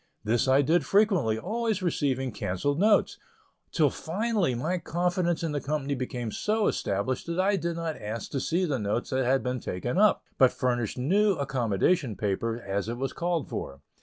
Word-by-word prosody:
This 115 Hz, +4 st, +1 dB
I 135 Hz, +2 st, +5 dB
did 160 Hz, +4 st, +3 dB
frequently, 190 Hz, -, +2 dB
always 215 Hz, -, -2 dB
receiving 135 Hz, -6 st, 0 dB
cancelled 105 Hz, -, -2 dB
notes, 210 Hz, +1 st, +3 dB, 0.5 s
till 150 Hz, -4 st, +3 dB
finally 195 Hz, -, -1 dB
my 165 Hz, +9 st, -1 dB
confidence 175 Hz, 0 st, 0 dB
in 165 Hz, -, -1 dB
the 145 Hz, -1 st, -2 dB
company 145 Hz, -1 st, -2 dB
became 125 Hz, -3 st, -4 dB
so 215 Hz, -, 0 dB
established 105 Hz, +9 st, -1 dB
that 170 Hz, +2 st, -2 dB
I 200 Hz, +2 st, +3 dB
did 170 Hz, -2 st, -2 dB
not 165 Hz, -4 st, -4 dB
ask 110 Hz, +2 st, -5 dB
to 140 Hz, -, -1 dB
see 170 Hz, +7 st, 0 dB
the 140 Hz, -6 st, -1 dB
notes 105 Hz, +5 st, -2 dB
that 130 Hz, 0 st, +1 dB
had 130 Hz, -1 st, +2 dB
been 125 Hz, 0 st, -2 dB
taken 120 Hz, -, -2 dB
up, 210 Hz, 0 st, +4 dB, 0.2 s
but 130 Hz, -2 st, +6 dB
furnished 120 Hz, -4 st, -1 dB
new 195 Hz, +11 st, +3 dB
accommodation 130 Hz, -, 0 dB
paper 110 Hz, +4 st, -1 dB
as 100 Hz, 0 st, -3 dB
it 120 Hz, -, -3 dB
was 135 Hz, +1 st, -3 dB
called 170 Hz, -4 st, -1 dB
for. 70 Hz, +1 st, -6 dB
140 Hz, 180 wpm, -27 LUFS, 120-175 Hz, 0.5 s, but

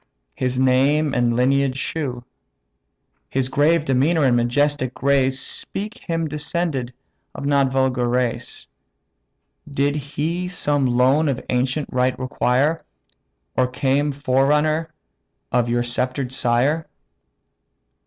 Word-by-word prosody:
his 125 Hz, 0 st, -2 dB
name 135 Hz, +3 st, +3 dB
and 120 Hz, -1 st, +1 dB
lineage 135 Hz, +1 st, +2 dB
shew. 135 Hz, -4 st, -3 dB, 1.1 s
His 130 Hz, -1 st, -1 dB
grave 150 Hz, +3 st, +2 dB
demeanour 145 Hz, +5 st, +2 dB
and 130 Hz, -3 st, +4 dB
majestic 130 Hz, +2 st, +1 dB
grace 135 Hz, -1 st, +1 dB
Speak 210 Hz, +3 st, -6 dB
him 165 Hz, -2 st, -2 dB
descended 150 Hz, -4 st, -2 dB, 0.4 s
of -, -, -6 dB
no 140 Hz, -1 st, +3 dB
vulgar 130 Hz, -2 st, 0 dB
race: 125 Hz, -1 st, -2 dB, 1.0 s
Did 140 Hz, 0 st, 0 dB
he 155 Hz, +5 st, -3 dB
some 145 Hz, -6 st, 0 dB
loan 130 Hz, +5 st, +3 dB
of 130 Hz, -2 st, -1 dB
ancient 130 Hz, +4 st, 0 dB
right 125 Hz, 0 st, +1 dB
require, 130 Hz, +4 st, +1 dB, 0.8 s
Or 130 Hz, -, +2 dB
came 135 Hz, +3 st, 0 dB
forerunner 150 Hz, +4 st, +1 dB, 0.6 s
of 120 Hz, -1 st, +1 dB
your 120 Hz, 0 st, +1 dB
sceptr'd 125 Hz, +2 st, -2 dB
sire?" 130 Hz, +6 st, +1 dB
135 Hz, 110 wpm, -21 LUFS, 125-150 Hz, 1.1 s, and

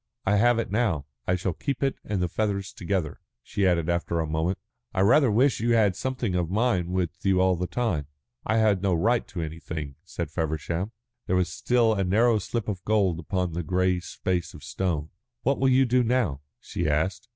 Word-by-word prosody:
I 105 Hz, +2 st, +3 dB
have 120 Hz, +2 st, +4 dB
it 115 Hz, -, -2 dB
now. 100 Hz, -, +1 dB, 0.2 s
I 90 Hz, -, +3 dB
shall 90 Hz, 0 st, -2 dB
keep 140 Hz, -, -3 dB
it 135 Hz, -, +2 dB
and 100 Hz, -4 st, -1 dB
the -, -, +1 dB
feathers 100 Hz, 0 st, -2 dB
together." 90 Hz, -4 st, -2 dB, 0.2 s
She 100 Hz, -2 st, 0 dB
added 85 Hz, -3 st, +2 dB
after 85 Hz, -1 st, 0 dB
a 80 Hz, -, 0 dB
moment: 80 Hz, +4 st, -1 dB, 0.4 s
"I 95 Hz, -, +2 dB
rather 125 Hz, +7 st, +5 dB
wish 125 Hz, +5 st, +3 dB
that -, -, -4 dB
you 120 Hz, 0 st, +3 dB
had 110 Hz, -, +5 dB
had 100 Hz, -3 st, +1 dB
something 125 Hz, -1 st, -2 dB
of 90 Hz, -2 st, 0 dB
mine 95 Hz, -4 st, +1 dB
with 90 Hz, -2 st, -2 dB
you 95 Hz, -2 st, +3 dB
all 95 Hz, 0 st, +4 dB
the 90 Hz, +1 st, -2 dB
time." 105 Hz, -13 st, -1 dB, 0.4 s
"I 110 Hz, -, +1 dB
had 105 Hz, -4 st, +3 dB
no 95 Hz, -3 st, +2 dB
right 115 Hz, +8 st, +1 dB
to 85 Hz, -5 st, -4 dB
anything," 80 Hz, -3 st, -6 dB
said -, -, -5 dB
Feversham. 80 Hz, +5 st, -2 dB, 0.4 s
There 90 Hz, -, +1 dB
was 90 Hz, -1 st, +1 dB
still 120 Hz, 0 st, +2 dB
a 100 Hz, -2 st, 0 dB
narrow 110 Hz, +4 st, +3 dB
slip 115 Hz, +2 st, -3 dB
of 95 Hz, -4 st, -3 dB
gold 100 Hz, -6 st, +2 dB
upon 90 Hz, +1 st, -2 dB
the 85 Hz, -, -2 dB
grey 90 Hz, +2 st, +1 dB
space 90 Hz, 0 st, -3 dB
of 75 Hz, -, -12 dB
stone. 80 Hz, +1 st, -2 dB, 0.3 s
"What 135 Hz, +3 st, +1 dB
will 135 Hz, -, +3 dB
you 130 Hz, +1 st, +5 dB
do 125 Hz, +1 st, +3 dB
now?" 115 Hz, -, 0 dB, 0.2 s
she -, -, -3 dB
asked. 95 Hz, +8 st, 0 dB
95 Hz, 210 wpm, -26 LUFS, 85-110 Hz, 0.4 s, rather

